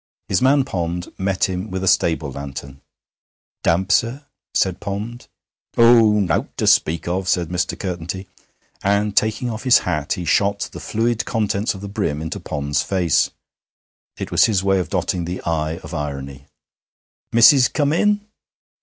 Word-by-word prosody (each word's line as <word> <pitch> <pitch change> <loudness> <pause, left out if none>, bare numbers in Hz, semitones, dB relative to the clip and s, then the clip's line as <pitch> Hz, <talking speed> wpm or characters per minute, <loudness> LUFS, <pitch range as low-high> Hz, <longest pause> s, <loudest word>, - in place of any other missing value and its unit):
His 95 - +1
man 135 +1 +4
Pond 90 -6 -4
met 95 0 -1
him 95 +2 -4
with 95 0 -4
a - - -1
stable 80 -5 +2
lantern. 70 0 -8 0.8
'Damp, 95 +3 +1
sir,' 120 +8 +1 0.3
said 95 0 0
Pond. 105 +5 -5 0.5
'Oh, 115 -3 +6
nowt 90 -5 -1
to - - 0
speak 80 +2 +2
of,' 90 +1 -1
said 90 -3 +1
Mr. 90 0 -2
Curtenty, 90 0 -5 0.5
and, 100 +1 +1
taking 110 +3 +1
off 110 0 -5
his 130 -2 +6
hat, 75 -5 -1
he 90 - -5
shot 100 +5 +1
the - - -8
fluid 115 +1 -1
contents 105 -2 -1
of 95 - -9
the 100 - -6
brim 100 -8 -2
into 80 0 -5
Pond's 70 -1 -2
face. 90 0 +1 0.9
It - - -6
was - - +5
his 100 -4 +1
way 95 -1 +2
of 90 - -3
dotting 90 -2 -1
the 90 +2 -4
'i' 80 -1 -1
of - - -9
irony. 70 -1 -5 0.8
'Missis 125 +3 +7
come 145 -1 0
in?' 210 +4 +2
95 Hz, 160 wpm, -20 LUFS, 85-110 Hz, 0.9 s, Missis